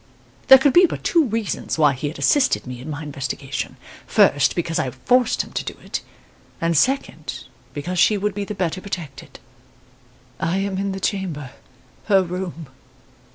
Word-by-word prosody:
There 265 - +11
could 270 0 +3
be 355 +1 +7
but - - -6
two 335 -3 +3
reasons 225 -7 -2
why 150 -3 +4
he 135 +3 -4
had 150 - -6
assisted 285 -2 +2
me 125 -1 -7
in 145 - -8
my 150 +1 -5
investigation. 140 -1 -5 0.3
First, 145 -1 +4
because 165 -1 -1
I 135 - 0
forced 245 - +1
him - - -14
to - - -3
do - - -6
it; - - -4 0.6
and, 165 0 0
second, 270 - 0 0.3
because 175 +5 -3
she 210 - +4
would 205 +1 -1
be 205 +1 -3
the 210 +1 -5
better 185 -1 -2
protected. 175 -8 -7 1.0
"I 165 +3 0
am 195 -1 -2
in 195 0 -1
the 190 - -4
chamber 175 -9 -3 0.5
her 195 -3 +4
room. 175 -4 -6
180 Hz, 170 wpm, -22 LUFS, 150-205 Hz, 1.0 s, There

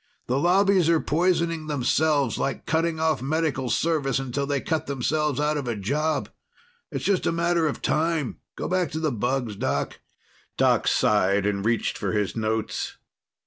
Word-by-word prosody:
The 130 +2 0
Lobbies 185 +1 +4
are 165 -1 +4
poisoning 165 0 0
themselves, 145 +1 +1
like 135 - -2
cutting 165 0 0
off 160 -4 +1
Medical 140 -2 -1
service 150 -5 +1
until 135 +1 -2
they 140 -1 0
cut 160 +2 -2
themselves 145 +1 0
out 150 0 +1
of 140 -3 -4
a 120 - -1
job. 145 +10 -1 0.6
It's - - -4
just 200 -3 +1
a - - +2
matter 170 -1 +1
of 145 - -4
time. 160 -4 0 0.2
Go - - -4
back 180 -3 0
to 160 - -2
the 155 -2 0
bugs, 120 -1 -1
Doc." - - -2 0.6
Doc - - +3
sighed 100 -1 +3
and 100 -1 0
reached 115 +1 0
for - - -2
his 105 -2 -1
notes. 110 -1 -2
150 Hz, 165 wpm, -25 LUFS, 125-165 Hz, 0.6 s, Lobbies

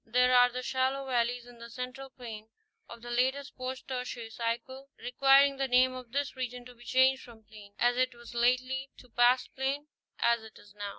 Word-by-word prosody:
There 250 +2 +3
are 245 0 +7
the 250 +1 -5
shallow 265 +1 0
valleys 245 -1 0
in 245 -1 -15
the 235 0 -10
Central 255 +3 -7
plain, 225 -4 -9 0.4
of 235 0 -11
the 240 - -7
latest 265 +3 0
post 255 0 -6
tertiary 250 -3 -5
cycle, 240 +4 -4
requiring 275 +2 +4
the 270 0 0
name 255 0 +4
of 250 -2 -9
this 280 +2 -2
region 250 -1 -5
to 250 - -12
be 240 0 -17
changed 260 +2 +4
from 230 -3 -14
plain, 210 -2 -15
as 245 0 +2
it 255 -1 +1
was 235 0 -12
lately, 255 +3 +1
to 250 - -16
pastplain, 260 +4 +1 0.3
as 235 -1 +3
it. 220 0 -13
is 205 - -17
now. 205 -1 -5
250 Hz, 195 wpm, -30 LUFS, 235-260 Hz, 0.4 s, are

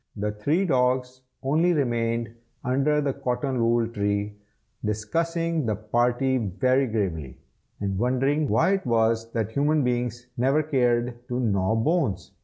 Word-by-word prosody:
The 105 0 -2
three 145 - 0
dogs 125 -3 +1 0.2
only 160 +6 +2
remained 115 -5 -1 0.3
under 140 +4 +2
the 140 -2 0
cotton 130 0 -2
wool 115 0 +2
tree, 105 -1 -2 0.5
discussing 165 +9 -1
the 110 - +1
party 120 +5 +1
very 130 +6 +1
gravely, 85 - -3 0.4
and 100 -2 -2
wondering 135 +5 +1
why 110 - +3
it 195 -1 0
was 115 0 +1
that 110 -2 -1
human 145 +3 +2
beings 120 -1 -1
never 135 +5 +2
cared 120 -4 0
to 125 0 -2
gnaw 100 -3 +1
bones. 115 - 0
120 Hz, 135 wpm, -25 LUFS, 110-140 Hz, 0.5 s, why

